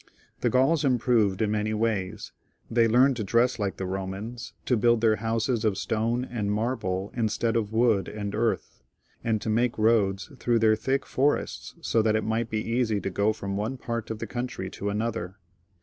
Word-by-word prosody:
The - - +1
Gauls 135 +5 +3
improved 120 -6 +2
in 105 - 0
many 110 0 0
ways; 105 -3 -2 0.4
they 115 0 +4
learned 125 +3 +4
to 110 - -2
dress 120 +4 +2
like 100 -2 -2
the - - -4
Bomans, 95 +5 -5
to 125 - +2
build 120 +1 +3
their 110 -1 +3
houses 115 +2 0
of 105 -3 +1
stone 115 +3 0
and 110 -5 -2
marble 105 -3 -1
instead 115 0 0
of 110 -3 0
wood 110 -3 +2
and 105 -1 -5
earth, 110 - -1 0.4
a^d 110 -2 +1
to - - -3
make 120 +2 +1
roads 110 0 +2
through 120 -1 +2
their 110 -1 +4
thick 130 +4 -1
forests, 140 +3 -1
so 115 - +2
that 110 0 +2
it 110 - +1
might 110 +1 -1
be 110 0 -2
easy 115 -3 +1
to 95 - -3
go 100 +4 +2
from 100 -2 -4
one 110 +6 -2
part 115 -2 -4
of 110 - -3
the 115 - -4
country 105 -3 -4
to 100 - -4
another. 105 -3 -3
110 Hz, 190 wpm, -27 LUFS, 105-120 Hz, 0.4 s, they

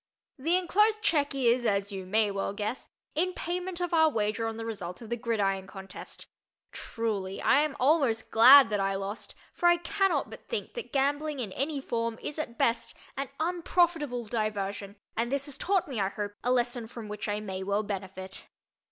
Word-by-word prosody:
The 330 +7 +2
enclosed 420 +4 +2
check 290 -9 +2
is, 245 -2 +3
as 200 -2 +1
you 190 -2 -6
may 210 +1 +3
well 195 0 -2
guess, 210 +4 -4 0.3
in 365 +4 +1
payment 360 +1 -3
of 355 -1 -2
our 320 -1 +6
wager 220 -2 -1
on 225 0 -4
the 225 - -5
result 185 -6 -5
of 230 -1 -10
the - - +2
gridiron 205 -5 -1
contest. 195 0 -9 0.5
Truly, 205 -4 -3
I 275 +1 +4
am 300 -2 -1
almost 260 -5 +2
glad 250 +2 +9
that 205 - +1
I 195 0 +1
lost, 195 +3 -5 0.2
for 350 - +2
I 345 - +5
can 390 +3 +1
not - - -1
but - - -11
think 470 - -3
that 480 - -6
gambling 290 +1 0
in 220 -6 -3
any 280 +6 -1
form 230 -3 -2
is 300 - -5
at 235 -6 -4
best 235 0 +1 0.2
an 275 0 -3
unprofitable 330 -6 +1
diversion, 205 -2 -3 0.2
and 235 +2 -1
this 280 0 0
has 285 -3 -7
taught 385 -1 +1
me, 260 -6 -3
I 195 -1 +1
hope, 205 0 -4
a 250 - +1
lesson 240 -2 0
from 230 -1 -8
which 210 +1 -5
I 205 0 -1
may 190 -3 -5
well 200 +2 0
benefit. 190 -2 -6
235 Hz, 195 wpm, -29 LUFS, 205-300 Hz, 0.5 s, glad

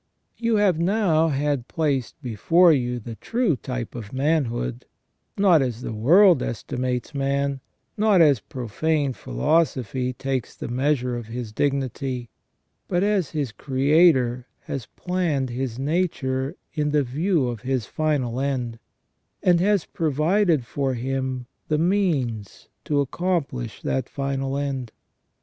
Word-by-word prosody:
You 230 -1 +1
have 200 -6 +3
now 170 -3 +2
had 140 -3 -1
placed 140 -6 -1
before 165 - +4
you 125 -3 0
the 115 +1 -7
true 230 - 0
type 125 -1 -5
of 110 -4 -7
manhood, 130 - -1 0.5
not 185 -6 +5
as 125 -3 -2
the - - -4
world 165 - +5
estimates 125 +3 -3
man, 140 0 0 0.4
not 210 -3 +4
as 145 -7 +5
profane 135 +6 -1
philosophy 125 - 0
takes 130 -1 -3
the - - -6
measure 125 0 0
of 120 -2 -6
his 115 -1 -5
dignity, 130 -1 -2 0.6
but 180 0 +1
as 200 -6 +1
his 145 -6 -2
Creator 130 -2 +3
has 130 -5 -5
planned 165 -8 -1
his 125 -1 -3
nature 135 -3 -1 0.2
in 150 -1 0
the 150 -1 +2
view 150 +3 0
of 120 -3 -4
his 130 -3 -1
final 135 -6 -1
end, 125 -4 -2 0.6
and 175 -2 +4
has 200 -1 +2
provided 160 - +1
for 135 +1 -1
him 130 0 -2 0.2
the 155 - +1
means 150 - 0 0.2
to 145 -1 +2
accomplish 140 - -2
that 130 -2 -1
final 135 0 -2
end. 135 -5 -3
135 Hz, 130 wpm, -24 LUFS, 125-160 Hz, 0.6 s, not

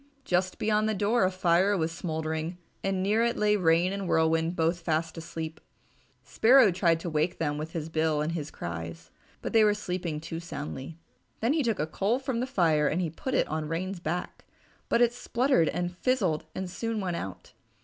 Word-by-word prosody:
Just 185 +1 0
beyond 215 0 +1
the 215 - 0
door 205 +2 +2
a - - +3
fire 185 +2 +2
was 160 -1 0
smouldering 160 0 -3 0.3
and 195 -1 0
near 215 +4 +2
it 235 0 +1
lay 210 0 +3
Rain 175 0 +3
and 200 -2 -3
Whirlwind 160 +1 +2
both 165 +1 +1
fast 160 -1 -1
asleep. 160 -1 -6 0.6
Sparrow 245 -2 +5
tried 170 -2 +2
to 170 - -3
wake 155 +3 0
them 150 -2 -1
with 155 +2 -6
his 160 -2 -3
bill 160 -1 +1
and 155 +2 -1
his 155 -3 -4
cries, 80 -1 -7 0.3
but - - -4
they 225 -1 +6
were 210 -1 +4
sleeping 180 -6 -3
too 165 +1 -6
soundly. 150 -2 -6 0.4
Then 235 +5 +2
he 315 - +2
took 230 -6 0
a 150 - 0
coal 200 +9 0
from 265 -3 -2
the 250 - -1
fire 160 - +2
and 165 -1 -1
put 260 -1 -3
it - - +2
on 155 0 -3
Rain's 185 +3 -3
back, 175 +1 -4 0.5
but 240 - +4
it 240 0 +3
spluttered 245 - +2
and 175 0 -2
fizzled 185 -9 0
and 190 - -3
soon 225 +5 -3
went 180 -4 -2
out. 95 -2 -7
175 Hz, 195 wpm, -28 LUFS, 160-205 Hz, 0.6 s, they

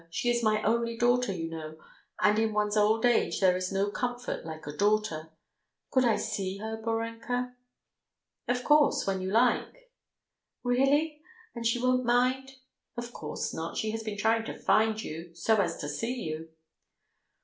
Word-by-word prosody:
She 240 +9 0
is 240 0 +1
my 215 -1 +2
only 230 +1 +1
daughter, 245 -1 +2
you 165 -3 -3
know, 160 -1 -7 0.5
and 210 +1 +4
in 220 -1 +1
one's 210 0 +1
old 215 +2 +3
age 240 -1 +2
there 185 -2 +4
is 185 0 -2
no 195 +1 0
comfort 245 +2 -3
like 160 -1 -8
a 145 - -4
daughter. 205 -5 +1 0.6
Could 260 -1 +3
I 230 -3 +4
see 195 -3 -3
her, 220 +2 -4
Borenka?" 230 +2 -3 0.9
"Of 245 0 0
course, 295 -1 +4
when 190 -1 -1
you 185 - -2
like." 250 - +1 0.7
"Really? 285 +5 +2 0.3
And 235 -1 -2
she 230 - +2
won't 255 +1 +2
mind?" 255 +2 +1 0.4
"Of 240 0 -5
course 150 - -4
not, 165 +1 -4
she 220 - -1
has 225 0 -3
been 215 -2 -5
trying 225 +1 +2
to - - -6
find 220 0 +2
you 165 +2 -8
so 215 +7 +2
as 175 -5 0
to 145 - -5
see 225 - -2
you." 160 +1 -5
220 Hz, 170 wpm, -29 LUFS, 195-245 Hz, 0.9 s, and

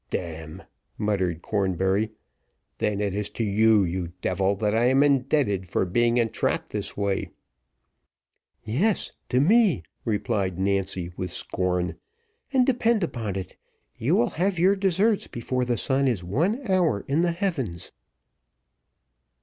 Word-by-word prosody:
"D - - 0
n!" 80 -2 -8 0.3
muttered 95 -5 -1
Cornbury; 95 +1 0 0.7
"then 105 -1 0
it 100 -2 -1
is 105 +1 -2
to 115 - -3
you, 110 0 +4
you 85 -1 -3
devil, 95 +2 +1
that 105 +1 0
I 115 +2 +3
am 135 +3 +4
indebted 130 - +1
for - - +1
being 120 +6 +2
entrapped 115 -2 0
this - - -4
way." 100 -1 -1 1.3
"Yes, 170 - 0 0.2
to 125 - +2
me," 195 - +4 0.2
replied 105 -4 -1
Nancy, 95 -2 -1
with 90 - -3
scorn. 90 +1 -2 0.5
"And, 260 -2 +4
depend 235 -5 +2
upon 115 - -3
it, 95 -2 -6 0.4
you - - +1
will 120 - +2
have 185 +2 0
your 185 +4 +4
deserts 195 +2 +2
before 125 +2 -2
the 120 -1 0
sun 135 +3 +1
is 110 -8 0
one 175 - 0
hour 175 - +1
in 145 +4 +2
the 175 -1 +1
heavens." 150 - -3
110 Hz, 140 wpm, -25 LUFS, 95-155 Hz, 1.3 s, you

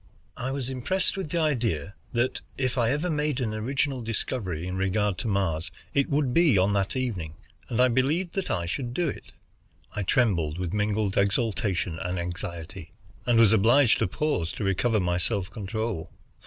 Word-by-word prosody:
I 130 - -3
was 135 -2 -2
impressed 135 +9 0
with 190 -5 -4
the 170 - -1
idea 115 - 0 0.2
that 120 +2 0 0.2
if 130 -2 0
I 120 -3 +2
ever 150 +7 0
made 150 -4 0
an 115 -4 -1
original 130 +4 -1
discovery 105 -6 -3
in 90 0 -3
regard 95 0 0
to - - -2
Mars, 85 -5 0 0.2
it 140 -1 +2
would 140 -3 +1
be 160 - +5
on 95 +2 +3
that 100 +2 0
evening, 95 -12 -2 0.3
and 120 - -1
I 125 - +7
believed 140 +9 +1
that 195 -2 -2
I 85 -4 0
should 120 +7 -3
do 175 - +1
it. - - -8 0.6
I 105 - -1
trembled 90 -7 +2
with 90 -1 -3
mingled 105 -1 +1
exultation 100 -4 0
and 90 +1 -2
anxiety, 85 0 -5 0.4
and 120 -1 +4
was 115 -2 +6
obliged 115 +4 +5
to - - +2
pause 90 - -1
to - - -4
recover 105 +4 +2
my 90 -1 +1
self 95 0 -1
control. 110 -3 -3
110 Hz, 180 wpm, -27 LUFS, 95-130 Hz, 0.6 s, I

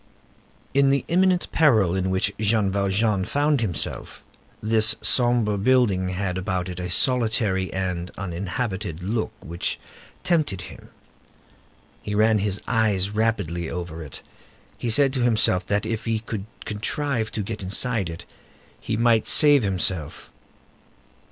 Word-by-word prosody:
In 140 0 +4
the 140 0 +1
imminent 185 +1 +2
peril 110 - +3
in 95 0 -1
which 95 +2 0
Jean 105 -2 +1
Valjean 100 +1 +1
found 145 +4 +1
himself, 90 -9 -4 0.4
this 110 0 +2
sombre 120 -5 +2
building 100 -5 +2
had 95 0 -2
about 95 -1 -2
it 90 0 -6
a 90 0 -4
solitary 110 -4 +1
and 90 -2 -3
uninhabited 95 -1 -4
look 110 +4 -2
which 85 +2 -2 0.5
tempted 155 - +1
him. - - -12 1.1
He 105 - -4
ran 110 0 +3
his 100 0 -1
eyes 105 -5 +1
rapidly 100 -7 -1
over 85 -1 -6
it; 75 -4 -9 0.5
he 120 - -4
said 135 +3 +5
to 130 - 0
himself, 110 -6 +2
that 100 +1 0
if 110 0 -3
he 115 -1 0
could 110 -2 -6 0.2
contrive 115 +2 -2
to 105 - -2
get 105 +1 -6
inside 100 +1 +1
it, 85 0 -8 0.5
he 110 - -3
might 115 -1 +3
save 145 -2 +6
himself. 95 -6 -2
105 Hz, 135 wpm, -23 LUFS, 95-115 Hz, 1.1 s, save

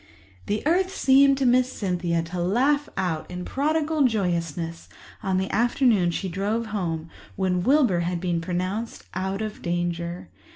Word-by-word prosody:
The 210 +5 -1
earth 365 +4 +3
seemed 275 -4 +5
to 270 - 0
Miss 255 +1 +3
Cynthia 175 -4 -1
to 175 +2 -4
laugh 270 +11 +2
out 180 -5 -2
in 180 0 -6
prodigal 305 +1 +1
joyousness 170 -6 -2 0.3
on 190 -1 0
the 190 0 0
afternoon 230 -4 +3
she 190 +3 -2
drove 205 +6 -1
home 165 -5 -3 0.2
when 185 -2 0
Wilbur 250 - +3
had 175 0 -1
been 175 -2 -1
pronounced 185 +6 -3
out 190 +3 -2
of 215 -1 -6
danger. 175 0 -2
190 Hz, 150 wpm, -25 LUFS, 175-245 Hz, 0.3 s, seemed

